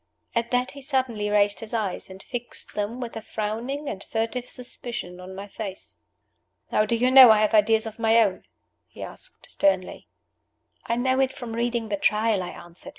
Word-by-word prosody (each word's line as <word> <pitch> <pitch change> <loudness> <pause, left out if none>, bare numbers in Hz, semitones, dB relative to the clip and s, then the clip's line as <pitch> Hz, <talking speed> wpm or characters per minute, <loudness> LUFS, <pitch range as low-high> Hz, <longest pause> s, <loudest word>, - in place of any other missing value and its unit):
At 235 0 0
that 250 +1 +1
he 280 - -11
suddenly 255 -6 -1
raised 205 0 +3
his 225 +1 -5
eyes, 205 -5 -2
and 190 +1 -10
fixed 245 -1 -6
them 210 +4 -3
with 240 -2 -5
a 225 - -4
frowning 230 +8 -3
and 195 - -5
furtive 235 +2 -2
suspicion 240 -7 -6
on 185 +1 -9
my 200 +1 -6
face. 195 -2 -8 0.7
"How 215 - +3
do 235 - +2
you 250 +2 +2
know 260 -2 +11
I 220 - +7
have 215 +1 +2
ideas 220 +1 +4
of 220 0 -7
my 225 0 +4
own?" 200 -5 +1 0.4
he - - -10
asked, - - -9
sternly. 190 -2 0 0.8
"I 235 - +1
know 260 +2 +1
it 265 -1 +2
from 240 -4 -7
reading 235 -1 -1
the 205 - 0
Trial," 210 +1 +2
I 180 - -4
answered. 175 +9 -9
225 Hz, 190 wpm, -25 LUFS, 205-245 Hz, 0.8 s, know